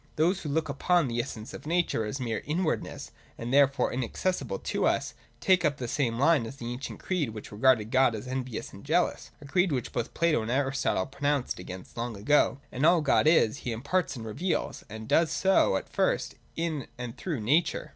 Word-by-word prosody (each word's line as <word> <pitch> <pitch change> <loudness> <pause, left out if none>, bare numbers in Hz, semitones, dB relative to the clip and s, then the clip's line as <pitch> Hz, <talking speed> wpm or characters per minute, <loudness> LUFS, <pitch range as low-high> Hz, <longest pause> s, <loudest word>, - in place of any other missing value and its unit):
Those 175 +5 +2
who 150 - -5
look 155 +2 0
upon 160 +3 +2
the 120 -1 -2
essence 110 0 -8
of - - -9
nature 170 -9 +1
as 120 +6 -4
mere 115 -4 -2
inwardness, 160 +2 -2 0.3
and 120 +2 -4
therefore 140 0 +4
inacces 130 +9 -1
sible 105 -8 -5
to - - 0
us, - - 0 0.3
take 185 -2 +3
up 145 -3 +1
the 125 - -4
same 120 -2 0
line 140 -3 +3
as 135 - -8
that 120 - -8
ancient 120 +3 -5
creed 175 -9 -1
which 105 - -8
regarded 110 0 +3
God 130 -3 +4
as 110 - -6
envious 130 -2 -4
and - - -11
jealous; - - 0
a - - -10
creed 175 +5 +2
which 125 -4 -2
both 120 -1 -3
Plato 165 -6 +2
and 110 - -4
Aristotle 135 -7 +1
pronounced 140 -3 -1
against 90 +3 -9
long 115 -2 -3
ago. 135 +5 +3 0.3
All 170 +3 +7
that 165 - 0
God 140 - +4
is. 140 -7 +4
He 125 - -4
imparts 140 +5 -1
and 115 -3 -7
reveals; 165 - -2
and 110 +1 -7
He - - -10
does 165 -1 +3
so, 190 - +3
at - - -6
first, - - 0 0.2
in 160 -5 -2
and 125 -2 -6
through 155 -11 -3
nature. 150 +11 +1
135 Hz, 205 wpm, -28 LUFS, 115-160 Hz, 0.3 s, All